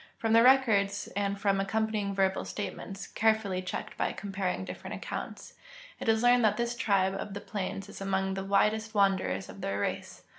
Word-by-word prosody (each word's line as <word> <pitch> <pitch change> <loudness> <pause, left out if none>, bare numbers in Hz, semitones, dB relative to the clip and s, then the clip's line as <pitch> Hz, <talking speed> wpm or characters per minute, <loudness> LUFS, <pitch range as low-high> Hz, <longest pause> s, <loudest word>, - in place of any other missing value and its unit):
From 225 -1 0
the 230 - +7
records 225 -6 +4
and 200 0 -1
from 200 -1 +2
accompanying 210 0 -1
verbal 190 -1 +1
statements, 195 -1 -6
carefully 220 -4 +1
checked 185 - -5
by - - 0
comparing 195 -2 -3
different - - -7
accounts, - - -6 0.5
it - - -2
is 220 +1 +3
learned 245 0 +5
that 210 -1 +3
this 235 0 -1
tribe 195 -6 +2
of 195 +1 -5
the - - -3
plains 195 -1 -4
is 200 - -10
among 190 0 0
the 195 0 -3
widest 215 +3 +1
wanderers 190 - +2
of - - -11
their 100 +1 -2
race. - - -4
200 Hz, 180 wpm, -30 LUFS, 195-220 Hz, 0.5 s, the